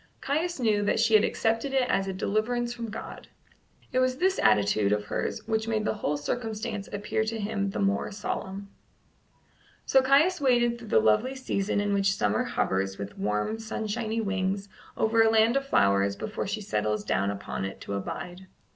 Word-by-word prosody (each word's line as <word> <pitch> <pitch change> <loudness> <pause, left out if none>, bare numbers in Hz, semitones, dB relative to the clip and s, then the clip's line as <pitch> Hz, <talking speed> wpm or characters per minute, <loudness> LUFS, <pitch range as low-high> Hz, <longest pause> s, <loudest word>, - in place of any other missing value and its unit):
Caius 320 +4 -1
knew 215 -4 +2
that 205 - +1
she 225 0 +3
had 215 -1 +7
accepted 230 +5 0
it 260 -2 +2
as 195 -4 +1
a - - -1
deliverance 235 +5 -1
from 235 -1 -6
God. 210 - -8 0.6
It 255 - +1
was 255 0 +1
this 375 +4 +1
attitude 105 -1 +3
of 105 0 0
hers - - -3
which 220 0 0
made 215 -1 0
the - - +1
whole 150 -8 -2
circumstance 215 +4 -3
appear 205 +2 -2
to 225 0 -3
him 205 -1 -1
the - - -5
more 200 +1 0
solemn. 200 -1 -5 1.2
So 265 - +5
Caius 290 +7 +4
waited 240 -3 +3
through 230 - -10
the 110 - +4
lovely 110 - +2
season 205 -6 -1
in 205 0 0
which 195 -1 +2
summer 105 +1 +1
hovers 95 0 -1
with 100 0 -7
warm 105 - -1
sunshiny 220 0 -3
wings 195 -1 -2 0.3
over 225 +1 +3
a 225 - +5
land 225 +2 +4
of 275 0 0
flowers 100 - +3
before 110 - -4
she 215 +2 -3
settles 105 - -1
down 100 -1 0
upon 100 -1 -4
it 95 0 -5
to - - -5
abide. 175 - -5
210 Hz, 180 wpm, -27 LUFS, 145-235 Hz, 1.2 s, had